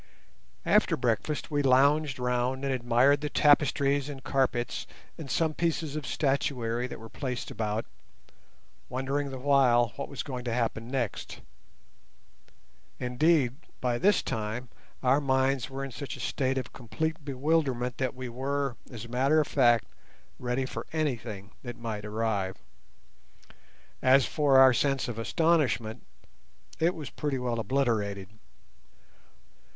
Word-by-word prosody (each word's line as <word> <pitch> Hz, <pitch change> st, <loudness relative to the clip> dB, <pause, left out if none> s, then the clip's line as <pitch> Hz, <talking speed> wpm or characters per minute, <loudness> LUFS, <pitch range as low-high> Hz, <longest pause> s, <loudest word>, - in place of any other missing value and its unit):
After -, -, +3 dB
breakfast 125 Hz, +7 st, -1 dB
we 145 Hz, -1 st, +1 dB
lounged 140 Hz, +2 st, +4 dB
round 125 Hz, +2 st, -1 dB
and 135 Hz, -, 0 dB
admired 125 Hz, +3 st, +3 dB
the 150 Hz, -, -2 dB
tapestries 145 Hz, -1 st, +3 dB
and 135 Hz, -3 st, -8 dB
carpets 125 Hz, -3 st, 0 dB, 0.3 s
and 155 Hz, -4 st, -8 dB
some 160 Hz, +4 st, +1 dB
pieces 160 Hz, -2 st, -1 dB
of 150 Hz, -3 st, -4 dB
statuary 125 Hz, -4 st, 0 dB
that -, -, -8 dB
were 115 Hz, -, -10 dB
placed 125 Hz, 0 st, -5 dB
about, 110 Hz, 0 st, -2 dB, 1.0 s
wondering 135 Hz, +3 st, -2 dB
the 135 Hz, -, -6 dB
while 130 Hz, -3 st, +4 dB
what -, -, -4 dB
was 140 Hz, -, -4 dB
going 125 Hz, -3 st, -5 dB
to 120 Hz, -, -1 dB
happen 115 Hz, -1 st, -1 dB
next. 125 Hz, -6 st, -3 dB, 1.6 s
Indeed, 130 Hz, 0 st, +2 dB, 0.2 s
by 120 Hz, -1 st, 0 dB
this 200 Hz, +2 st, +3 dB
time 110 Hz, +3 st, -3 dB, 0.3 s
our 135 Hz, +3 st, +4 dB
minds 130 Hz, -3 st, +1 dB
were 135 Hz, 0 st, -4 dB
in 135 Hz, -, -7 dB
such 140 Hz, +3 st, -6 dB
a -, -, -12 dB
state 135 Hz, -1 st, -1 dB
of 130 Hz, -4 st, -4 dB
complete 160 Hz, +6 st, -3 dB
bewilderment 135 Hz, -3 st, 0 dB
that 130 Hz, -1 st, -1 dB
we 130 Hz, 0 st, -6 dB
were, 135 Hz, +1 st, -2 dB
as 120 Hz, -2 st, -8 dB
a -, -, -10 dB
matter 135 Hz, +6 st, +3 dB
of 150 Hz, -, +2 dB
fact, 120 Hz, -5 st, +3 dB, 0.5 s
ready 125 Hz, +1 st, -1 dB
for -, -, -6 dB
anything 115 Hz, -10 st, -3 dB
that 120 Hz, -2 st, -7 dB
might 110 Hz, -3 st, -5 dB
arrive. 105 Hz, -3 st, -1 dB, 1.5 s
As 130 Hz, +1 st, +5 dB
for 145 Hz, -3 st, +3 dB
our 130 Hz, -1 st, +8 dB
sense 135 Hz, +2 st, +1 dB
of 115 Hz, -2 st, -5 dB
astonishment, 135 Hz, -5 st, +1 dB, 0.8 s
it 170 Hz, +3 st, +2 dB
was 150 Hz, -4 st, -7 dB
pretty 145 Hz, -3 st, -2 dB
well 120 Hz, -2 st, -2 dB
obliterated. 110 Hz, -7 st, 0 dB
130 Hz, 135 wpm, -28 LUFS, 120-140 Hz, 1.6 s, our